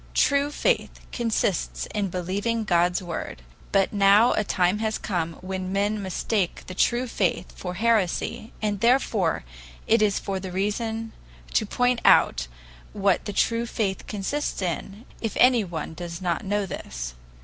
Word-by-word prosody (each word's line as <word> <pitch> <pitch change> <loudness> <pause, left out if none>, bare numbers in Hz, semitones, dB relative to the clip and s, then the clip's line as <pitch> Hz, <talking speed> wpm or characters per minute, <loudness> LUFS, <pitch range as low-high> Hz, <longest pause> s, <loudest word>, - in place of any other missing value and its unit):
True 280 0 +3
faith 295 - 0
consists 225 -5 -1
in 205 -2 -1
believing 200 +6 -1
God's 175 -2 +2
Word; 165 - -5 0.3
but 195 0 +2
now 205 +4 +5
a 215 - +1
time 185 0 +1
has 220 0 -1
come 170 -5 -2
when 185 0 -4
men 205 +2 0
mistake 190 0 -1
the 185 - -7
true 240 +6 +2
faith 185 -6 -1
for 180 -1 -5
heresy, 220 0 0
and 205 -2 0
therefore 230 - +2 0.4
it 225 0 +3
is 205 -2 +3
for 195 -1 -3
the 185 -1 -6
reason 220 +4 -2 0.4
to 215 - +2
point 245 +2 +1
out 60 0 +5 0.5
what 195 -2 +1
the 205 - -3
true 230 +3 +1
faith 200 -4 -2
consists 215 +9 -2
in, 195 +5 -4 0.2
if 225 - -3
anyone 210 -11 +2
does 170 0 -6
not 175 -3 -1
know 205 +1 0
this. - - -6
200 Hz, 150 wpm, -25 LUFS, 180-225 Hz, 0.5 s, now